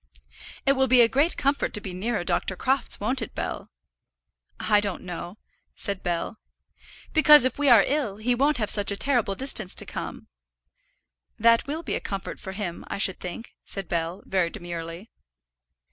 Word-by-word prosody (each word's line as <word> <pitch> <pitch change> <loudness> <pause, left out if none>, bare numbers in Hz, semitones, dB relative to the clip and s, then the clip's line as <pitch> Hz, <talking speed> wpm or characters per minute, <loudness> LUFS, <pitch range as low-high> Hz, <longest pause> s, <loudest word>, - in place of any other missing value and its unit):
"It 275 - +5
will 265 -1 +2
be 255 -2 +6
a 235 - +7
great 285 +8 +1
comfort 280 -3 0
to - - -1
be 195 -3 -7
nearer 205 +2 -2
Dr. 190 - -1
Crofts; 265 +6 0
won't 250 +5 -1
it, 225 - -6
Bell?" - - -4 0.9
"I 210 -1 +3
don't 200 -3 -4
know," 175 +1 -7 0.4
said 200 -2 -4
Bell. 175 +5 -3 0.7
"Because 300 -4 +8
if 260 - -1
we 290 -1 +3
are 230 -5 +8
ill, 265 -9 -1
he 235 +3 +1
won't 280 +4 +2
have 215 -3 0
such 205 -1 +3
a - - -1
terrible 240 -7 +1
distance 215 -7 +1
to - - -1
come." - - -7 1.1
"That 230 +2 +4
will 310 +4 -4
be - - -3
a - - 0
comfort 195 -1 -5
for 190 - -7
him, 185 -4 -5
I - - -4
should 195 -2 +2
think," 190 +6 -7
said 195 -3 -4
Bell, 170 +2 -3
very 185 -3 0
demurely. 170 +3 -7
210 Hz, 175 wpm, -25 LUFS, 185-260 Hz, 1.1 s, Because